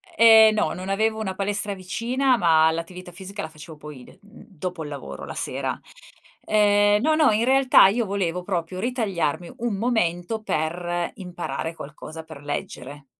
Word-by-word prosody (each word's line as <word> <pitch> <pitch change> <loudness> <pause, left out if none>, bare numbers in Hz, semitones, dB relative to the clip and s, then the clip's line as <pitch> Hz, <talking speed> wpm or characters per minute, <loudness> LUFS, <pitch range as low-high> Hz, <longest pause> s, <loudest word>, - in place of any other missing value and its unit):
E 230 - +4 0.2
ehm, - - 0
no, 215 - 0
non 185 +2 -7
avevo 220 +2 0
una 190 -4 -3
palestra 205 +1 -1
vicina, 240 +8 0
ma 160 -4 +4
l'attività 175 +2 -6
fisica 195 +3 -8
la 160 - -5
facevo 155 0 -12
poi 150 -4 -11
de - - -18
mhmm, 205 +3 -16
dopo 180 -2 -6
il 150 - -7
lavoro, 140 - -8
la - - -7
sera. - - -3 0.7
Ehm, 205 -1 +3
no, 310 +3 +3
no, 310 -4 +4
in 215 +2 +1
realtà 265 -3 +6
io 230 +4 0
volevo 180 -3 -2
proprio 180 -1 -3
ritagliarmi 195 - -2
un 235 -3 -2
momento 215 -2 -1
per 175 0 -2
imparare 175 -3 -5
qualcosa, 155 +2 -9
per 160 -3 -12
leggere 145 -1 -6
185 Hz, 170 wpm, -24 LUFS, 165-215 Hz, 0.7 s, realtà